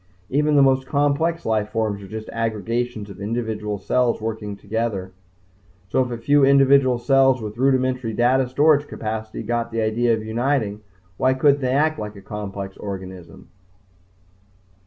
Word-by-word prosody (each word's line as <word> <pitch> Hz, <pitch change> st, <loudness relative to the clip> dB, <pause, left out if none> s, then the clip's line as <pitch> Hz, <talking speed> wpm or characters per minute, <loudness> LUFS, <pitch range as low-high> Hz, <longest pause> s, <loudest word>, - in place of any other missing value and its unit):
Even 150 Hz, +2 st, +2 dB
the 140 Hz, -, +6 dB
most 135 Hz, -1 st, +2 dB
complex 145 Hz, +4 st, 0 dB
life 110 Hz, -2 st, 0 dB
forms 110 Hz, -3 st, -2 dB
are 100 Hz, -, -10 dB
just 110 Hz, +2 st, -7 dB
aggregations 115 Hz, 0 st, -2 dB
of 100 Hz, -, -11 dB
individual 110 Hz, -1 st, -3 dB
cells 125 Hz, +4 st, 0 dB
working 110 Hz, -2 st, -4 dB
together. 105 Hz, -3 st, -3 dB, 0.8 s
So 130 Hz, -, +2 dB
if 125 Hz, -, -6 dB
a 120 Hz, -, -4 dB
few 145 Hz, +5 st, +3 dB
individual 135 Hz, -2 st, +5 dB
cells 135 Hz, +1 st, +3 dB
with 105 Hz, -1 st, -6 dB
rudimentary 130 Hz, -3 st, +1 dB
data 125 Hz, +3 st, +2 dB
storage 145 Hz, +2 st, +3 dB
capacity 110 Hz, 0 st, -5 dB
got 115 Hz, +1 st, -2 dB
the 115 Hz, -1 st, -2 dB
idea 115 Hz, +2 st, +2 dB
of 110 Hz, -, -6 dB
uniting 110 Hz, -2 st, -1 dB, 0.4 s
why 130 Hz, 0 st, +2 dB
couldn't 140 Hz, +1 st, +3 dB
they 130 Hz, -1 st, 0 dB
act 155 Hz, +3 st, +1 dB
like 105 Hz, 0 st, -6 dB
a 100 Hz, -, -11 dB
complex 100 Hz, -1 st, -6 dB
organism? 95 Hz, -4 st, -8 dB
115 Hz, 155 wpm, -22 LUFS, 105-135 Hz, 0.8 s, the